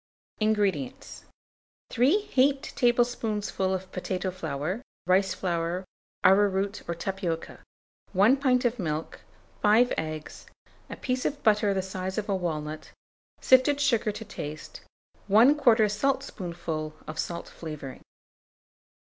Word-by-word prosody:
INGREDIENTS. 205 Hz, -, -1 dB, 0.7 s
3 280 Hz, -, +3 dB
heaped 275 Hz, -5 st, +1 dB
tablespoonfuls 225 Hz, -6 st, +1 dB
of 190 Hz, -, -22 dB
potato 185 Hz, 0 st, -3 dB
flour, 165 Hz, -, -3 dB, 0.2 s
rice 190 Hz, +2 st, +2 dB
flour, 175 Hz, 0 st, -2 dB, 0.4 s
arrowroot, 195 Hz, +1 st, +3 dB
or 170 Hz, -, -1 dB
tapioca, 170 Hz, -2 st, -4 dB, 0.5 s
1 210 Hz, +8 st, +5 dB
pint 255 Hz, -2 st, +2 dB
of 240 Hz, 0 st, 0 dB
milk, 155 Hz, -3 st, -3 dB, 0.4 s
5 225 Hz, +4 st, +4 dB
eggs, 155 Hz, -1 st, -6 dB, 0.4 s
a -, -, -6 dB
piece 255 Hz, -1 st, -2 dB
of 290 Hz, 0 st, -3 dB
butter 210 Hz, -1 st, +3 dB
the 190 Hz, -1 st, 0 dB
size 190 Hz, 0 st, -5 dB
of 215 Hz, -, -2 dB
a 200 Hz, -, +1 dB
walnut, 155 Hz, -4 st, -4 dB, 0.5 s
sifted 260 Hz, +2 st, +5 dB
sugar 235 Hz, -7 st, +2 dB
to 225 Hz, +2 st, -8 dB
taste, 155 Hz, -6 st, -7 dB, 0.5 s
1/4 230 Hz, -1 st, +5 dB
saltspoonful 175 Hz, -, -2 dB
of 155 Hz, 0 st, -7 dB
salt 170 Hz, -1 st, -3 dB
flavouring. 150 Hz, -5 st, -8 dB
195 Hz, 115 wpm, -27 LUFS, 170-240 Hz, 0.7 s, 1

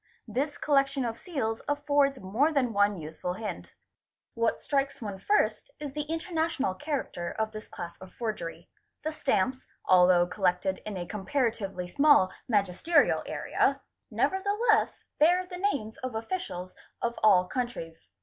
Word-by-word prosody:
This 290 Hz, +3 st, -2 dB
collection 275 Hz, -2 st, +2 dB
of 230 Hz, -1 st, -3 dB
seals 245 Hz, -, -2 dB
affords 285 Hz, -2 st, +2 dB
more 225 Hz, +12 st, +1 dB
than 260 Hz, -6 st, +1 dB
one 205 Hz, 0 st, +3 dB
useful 160 Hz, +3 st, -5 dB
hint. 210 Hz, +2 st, -6 dB, 0.6 s
What 230 Hz, -1 st, 0 dB
strikes 275 Hz, -1 st, 0 dB
one 205 Hz, -4 st, -5 dB
first 420 Hz, -, +1 dB
is 290 Hz, -2 st, -5 dB
the 300 Hz, +1 st, -4 dB
international 325 Hz, -, -1 dB
character 190 Hz, -, -3 dB
of 220 Hz, 0 st, -2 dB
this 215 Hz, -1 st, -8 dB
class 175 Hz, -1 st, -7 dB
of 185 Hz, -, -10 dB
forgery; 210 Hz, -8 st, -5 dB, 0.4 s
the 310 Hz, -, -1 dB
stamps, 260 Hz, -4 st, 0 dB, 0.2 s
'although 180 Hz, -1 st, +6 dB
collected 185 Hz, 0 st, 0 dB
in 205 Hz, -2 st, -4 dB
a 175 Hz, -, -4 dB
comparatively 210 Hz, -3 st, -2 dB
small 280 Hz, -3 st, +5 dB, 0.2 s
magisterial 205 Hz, -, +3 dB
area, -, -, +1 dB, 0.3 s
never 380 Hz, -, +1 dB
the 405 Hz, +1 st, 0 dB, 0.2 s
'less 425 Hz, -, +1 dB, 0.2 s
bear 355 Hz, +4 st, +5 dB
the 360 Hz, 0 st, -8 dB
names 280 Hz, -, -1 dB
of 255 Hz, -3 st, -5 dB
officials 220 Hz, -, -4 dB, 0.3 s
of 235 Hz, 0 st, -2 dB
all 190 Hz, -4 st, +6 dB
countries. 240 Hz, -11 st, -4 dB
235 Hz, 145 wpm, -29 LUFS, 190-290 Hz, 0.6 s, although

